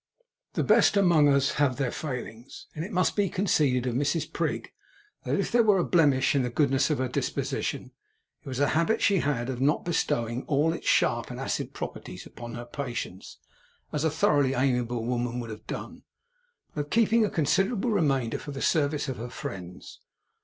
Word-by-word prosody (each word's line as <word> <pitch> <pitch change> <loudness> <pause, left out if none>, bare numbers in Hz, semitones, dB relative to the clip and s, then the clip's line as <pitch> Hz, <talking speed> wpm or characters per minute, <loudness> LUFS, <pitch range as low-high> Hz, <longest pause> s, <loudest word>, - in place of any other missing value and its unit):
The - - 0
best - - +4
among 170 -7 +5
us 140 -1 +3
have 135 -3 +3
their 135 -3 -1
failings, 125 -4 -7
and 155 - -4
it 190 - -7
must 185 -2 +1
be 205 -2 +1
conceded 145 -10 +1
of 125 - -1
Mrs 145 +6 -1
Prig, - - -2 0.5
that - - 0
if - - -1
there 240 - +5
were 210 -3 +4
a 180 - +2
blemish 145 -8 +3
in 140 - +2
the 125 - -1
goodness 135 +1 +2
of 150 - +1
her 130 - -1
disposition, 125 - -3 0.5
it - - -16
was 130 -1 -4
a 145 -1 +3
habit 170 +8 +1
she 200 -3 +4
had 135 -6 -1
of 130 -1 -4
not 150 +6 +2
bestowing 120 -8 -1
all 155 +3 +2
its 170 - -7
sharp - - +2
and - - -7
acid - - -3
properties - - -7
upon 120 -1 -9
her 120 0 -6
patients 120 -7 -6 0.6
(as 150 0 -1
a 160 - +3
thoroughly 145 -3 +2
amiable 125 -3 0
woman 120 0 -2
would 115 -2 -6
have 110 0 -10
done), - - -6 0.7
but 145 -1 -2
of - - -23
keeping 230 0 +3
a 210 - +1
considerable 195 - +1
remainder 135 - +1
for - - -9
the 140 -1 -5
service 150 -1 +1
of 130 - -4
her 120 +3 -6
friends. 90 -6 -8
140 Hz, 190 wpm, -27 LUFS, 125-165 Hz, 0.7 s, among